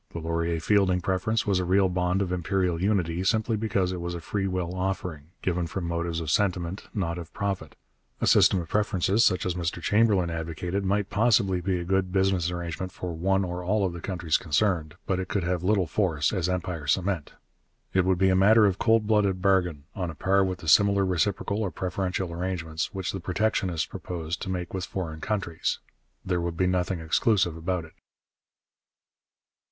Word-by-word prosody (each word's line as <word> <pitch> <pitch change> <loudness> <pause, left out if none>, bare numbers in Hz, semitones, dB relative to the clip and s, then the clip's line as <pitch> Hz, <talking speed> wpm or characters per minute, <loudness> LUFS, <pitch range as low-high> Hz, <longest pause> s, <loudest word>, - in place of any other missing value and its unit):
The - - -5
Laurier 85 0 -1
Fielding 95 0 +2
preference 95 +5 0
was 100 -3 +2
a - - 0
real 95 +2 +3
bond 90 +1 0
of 90 - -4
imperial 90 -1 0
unity 90 -4 +1
simply 110 +3 +1
because 100 -4 0
it 90 -1 -4
was 85 0 -3
a - - -4
free 95 +4 -2
will 90 -2 -2
offering, 90 -5 -3 0.2
given 90 -2 0
from 90 +3 -4
motives 85 0 -2
of 80 -3 -3
sentiment, 90 -1 0
not 85 -4 -2
of 85 -1 -9
profit. 100 -2 -3 0.4
A - - 0
system 95 - +5
of 85 - -5
preferences 105 +2 +2
such 90 - +2
as 90 - 0
Mr 85 -1 -3
Chamberlain 100 -2 +2
advocated 85 +4 -3
might 100 +1 0
possibly 105 -4 +3
be 95 0 0
a - - -3
good 95 +1 0
business 95 -2 +2
arrangement 85 +1 -4
for 90 -2 -5
one 95 +4 +1
or 90 0 -4
all 100 +2 +1
of 90 - -2
the 85 - -7
countries 85 -5 0
concerned, 80 -1 0
but 95 -1 0
it 95 - -3
could 100 -1 -1
have 90 0 -1
little 95 0 +2
force 80 -3 0
as 90 -3 0
empire 90 -4 -3
cement. 90 +1 0 0.6
It 95 - +4
would 95 0 +2
be 95 +1 +3
a 95 - +3
matter 105 +3 +6
of 100 -1 +1
cold 115 -1 +3
blooded 105 -3 +2
bargain, 90 -6 +1
on 90 -3 -3
a 80 - -7
par 95 +5 +2
with 95 -1 -3
the 80 - -8
similar 100 +4 +5
reciprocal 95 +3 0
or 100 - 0
preferential 90 +1 -3
arrangements 85 -3 -3
which 95 -2 -3
the 95 - -5
protectionists 90 -2 0
proposed 85 -1 -5
to 95 - -4
make 90 -2 -4
with 95 -1 -3
foreign 80 -5 -5
countries. 100 -6 -2 0.5
There 90 -2 0
would 85 -1 -3
be 95 - +2
nothing 90 0 0
exclusive 90 +2 +2
about 85 0 -2
it. 80 - -16
90 Hz, 190 wpm, -26 LUFS, 85-95 Hz, 0.6 s, matter